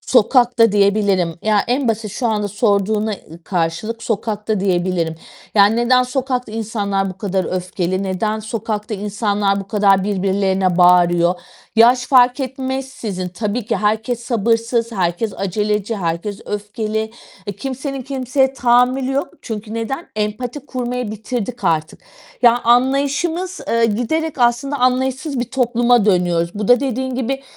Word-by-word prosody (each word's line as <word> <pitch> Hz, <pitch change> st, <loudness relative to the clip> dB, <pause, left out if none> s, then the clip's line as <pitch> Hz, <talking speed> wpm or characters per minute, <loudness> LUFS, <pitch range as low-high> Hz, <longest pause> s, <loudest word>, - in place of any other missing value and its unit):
Sokakta 240 Hz, -2 st, +3 dB
diyebilirim. 200 Hz, -4 st, +2 dB
Ya, 215 Hz, -1 st, +3 dB
en 255 Hz, +1 st, +1 dB
basit 220 Hz, -2 st, -1 dB
şu 240 Hz, +3 st, -2 dB
anda 210 Hz, -2 st, 0 dB
sorduğuna, 210 Hz, +1 st, +1 dB
ııı, 165 Hz, +2 st, -13 dB
karşılık 185 Hz, +6 st, -2 dB
sokakta 215 Hz, -1 st, -2 dB
diyebilirim. 175 Hz, -3 st, 0 dB, 0.4 s
Yani, 205 Hz, +2 st, +5 dB
neden 250 Hz, +1 st, +4 dB
sokakta 250 Hz, -2 st, -2 dB
insanlar 200 Hz, -3 st, -2 dB
bu 185 Hz, -, -11 dB
kadar 195 Hz, -2 st, -1 dB
öfkeli? 185 Hz, +1 st, -2 dB
Neden 205 Hz, +3 st, -1 dB
sokakta 215 Hz, 0 st, -4 dB
insanlar 205 Hz, -1 st, 0 dB
bu 195 Hz, -, -10 dB
kadar 200 Hz, -2 st, +3 dB
birbirlerine 190 Hz, -2 st, 0 dB
bağırıyor? 175 Hz, 0 st, +4 dB, 0.4 s
Yaş 245 Hz, +2 st, +5 dB
fark 250 Hz, 0 st, +4 dB
etmeksizin, 260 Hz, -7 st, -4 dB
tabii 210 Hz, +5 st, -3 dB
ki -, -, 0 dB
herkes 220 Hz, +3 st, 0 dB
sabırsız, 230 Hz, 0 st, 0 dB
herkes 190 Hz, +2 st, -1 dB
aceleci, 210 Hz, +3 st, -1 dB
herkes 180 Hz, +2 st, -3 dB
öfkeli. 215 Hz, +1 st, -3 dB, 0.3 s
E, 205 Hz, -, -3 dB
kimsenin 270 Hz, +3 st, -4 dB
kimseye 265 Hz, 0 st, 0 dB
tahammülü 255 Hz, +1 st, +2 dB
yok. 275 Hz, +1 st, -1 dB
Çünkü 220 Hz, -1 st, -6 dB
neden? 230 Hz, +8 st, -4 dB
Empati 225 Hz, +6 st, -3 dB
kurmayı 250 Hz, -3 st, -3 dB
bitirdik 235 Hz, +2 st, -5 dB
artık. 155 Hz, -1 st, 0 dB, 0.4 s
Ya, 240 Hz, 0 st, +5 dB
anlayışımız, 280 Hz, +9 st, +1 dB
eee, 230 Hz, 0 st, +3 dB
giderek 275 Hz, +9 st, -1 dB
aslında 245 Hz, +4 st, +1 dB
anlayışsız 260 Hz, +2 st, 0 dB
bir -, -, 0 dB
topluma 240 Hz, -3 st, +2 dB
dönüyoruz. 175 Hz, -4 st, +2 dB
Bu 210 Hz, -1 st, -3 dB
da 245 Hz, 0 st, +6 dB
dediğin 260 Hz, -1 st, -2 dB
gibi, 265 Hz, +2 st, -2 dB
220 Hz, 135 wpm, -18 LUFS, 200-250 Hz, 0.4 s, da